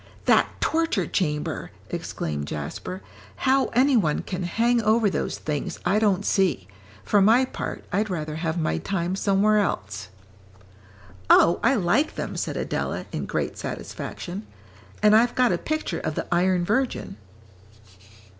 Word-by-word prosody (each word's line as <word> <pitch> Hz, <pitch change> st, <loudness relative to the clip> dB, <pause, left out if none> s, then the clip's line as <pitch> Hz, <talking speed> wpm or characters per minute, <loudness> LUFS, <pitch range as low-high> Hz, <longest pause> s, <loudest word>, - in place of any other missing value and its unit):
"That -, -, +5 dB
torture 330 Hz, +1 st, +1 dB
chamber!" 150 Hz, -5 st, -2 dB, 0.2 s
exclaimed 75 Hz, -2 st, -4 dB
Jasper; 80 Hz, +6 st, -5 dB, 0.3 s
"how 265 Hz, 0 st, +2 dB
any 260 Hz, +3 st, +3 dB
one 160 Hz, -10 st, +1 dB
can 185 Hz, -1 st, -4 dB
hang 230 Hz, +7 st, +1 dB
over 220 Hz, -1 st, +3 dB
those -, -, -2 dB
things, 150 Hz, -2 st, -3 dB
I 195 Hz, +4 st, +3 dB
don't 205 Hz, -2 st, +2 dB
see; 190 Hz, -3 st, +1 dB, 0.4 s
for 205 Hz, -, +3 dB
my 230 Hz, +6 st, +5 dB
part, -, -, -6 dB
I'd 210 Hz, +3 st, +1 dB
rather 155 Hz, -4 st, -3 dB
have 165 Hz, 0 st, -2 dB
my 155 Hz, -, 0 dB
time 185 Hz, -1 st, -2 dB
somewhere 200 Hz, +2 st, +3 dB
else." 100 Hz, -, -2 dB, 1.2 s
"Oh, 170 Hz, -, +6 dB
I 265 Hz, +4 st, +3 dB
like 215 Hz, -, +1 dB
them," -, -, -4 dB
said -, -, -3 dB
Adela, -, -, -2 dB
in -, -, -4 dB
great -, -, -2 dB
satisfaction, 190 Hz, +4 st, -6 dB, 0.6 s
"and 210 Hz, 0 st, +7 dB
I've 235 Hz, +2 st, +4 dB
got 250 Hz, -2 st, +3 dB
a -, -, +1 dB
picture 310 Hz, 0 st, -2 dB
of 155 Hz, -2 st, -3 dB
the -, -, -2 dB
'Iron 180 Hz, 0 st, +2 dB
Virgin.'" 235 Hz, -, -1 dB
195 Hz, 145 wpm, -25 LUFS, 170-230 Hz, 1.2 s, and